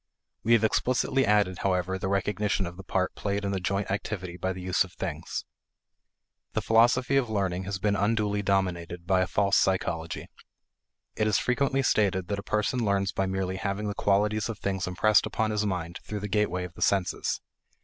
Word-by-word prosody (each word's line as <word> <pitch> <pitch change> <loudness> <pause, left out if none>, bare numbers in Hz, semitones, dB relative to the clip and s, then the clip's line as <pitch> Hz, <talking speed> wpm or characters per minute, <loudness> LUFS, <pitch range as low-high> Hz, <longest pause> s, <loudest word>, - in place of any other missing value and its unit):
We 115 +1 +4
have 115 -1 +4
explicitly 130 +4 +2
added, 100 -3 +2
however, 95 0 0
the 95 - -2
recognition 100 +1 0
of 85 0 -6
the 95 - -10
part 95 -1 -1
played 100 0 -2
in 100 - -1
the 95 - -1
joint 100 +2 -1
activity 95 -3 -3
by 95 +1 -2
the 95 - -6
use 90 +1 +2
of 95 - -12
things. - - -4 1.1
The - - 0
philosophy 120 +4 +4
of 130 -4 +1
learning 95 -3 -1
has 100 +1 -3
been 100 +1 +1
unduly 105 0 +1
dominated 90 -3 -1
by 95 0 +3
a 90 - +1
false 100 +2 +2
psychology. 85 -4 0 0.9
It 110 - +1
is 105 - +3
frequently 135 +1 +1
stated 95 -6 +1
that 100 -1 -1
a - - -4
person 105 +4 0
learns 100 -2 +1
by 95 - -1
merely 95 0 -2
having 100 +2 -2
the - - -2
qualities 105 +2 +1
of 115 - -4
things 95 -2 -2
impressed 100 +4 +3
upon 110 -1 -1
his 105 0 0
mind 85 -3 -3
through 105 -1 -5
the 105 - -3
gateway 95 -3 0
of 90 -2 -7
the - - -13
senses. 95 -3 +1
100 Hz, 190 wpm, -27 LUFS, 95-105 Hz, 1.1 s, We